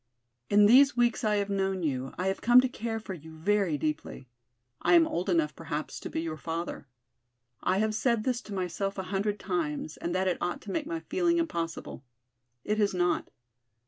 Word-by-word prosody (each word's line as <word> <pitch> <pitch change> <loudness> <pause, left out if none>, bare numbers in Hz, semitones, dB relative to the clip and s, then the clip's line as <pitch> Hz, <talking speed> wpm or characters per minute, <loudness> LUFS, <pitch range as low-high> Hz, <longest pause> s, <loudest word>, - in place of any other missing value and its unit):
In 205 0 +6
these 265 +5 +6
weeks 240 -1 +2
I 210 -1 +2
have 200 0 -1
known 190 -2 0
you 135 -3 -2
I 180 - -2
have 190 0 -1
come 240 +1 +7
to 260 - +1
care 225 -2 -4
for 205 -3 -7
you 160 -2 -11
very 195 -2 +1
deeply. 150 -3 -4 0.5
I - - +4
am 335 -1 +7
old 185 - -2
enough 165 -4 +1
perhaps 155 -2 -5
to - - -6
be - - -2
your 160 -1 -4
father. 165 -2 -5 0.7
I 185 - +1
have 215 +1 +1
said 225 0 +1
this 245 -1 0
to - - -5
myself 190 +2 -2
a 190 - -2
hundred 205 +1 0
times 160 -5 -3
and 175 +1 -3
that 190 +1 +1
it 180 - 0
ought 175 - -2
to 205 - -7
make 305 +4 -2
my 330 0 -3
feeling 345 -2 +1
impossible. 165 - -3 0.6
It 210 +1 -1
has 205 -3 +2
not. 175 0 +1
195 Hz, 200 wpm, -29 LUFS, 165-220 Hz, 0.7 s, come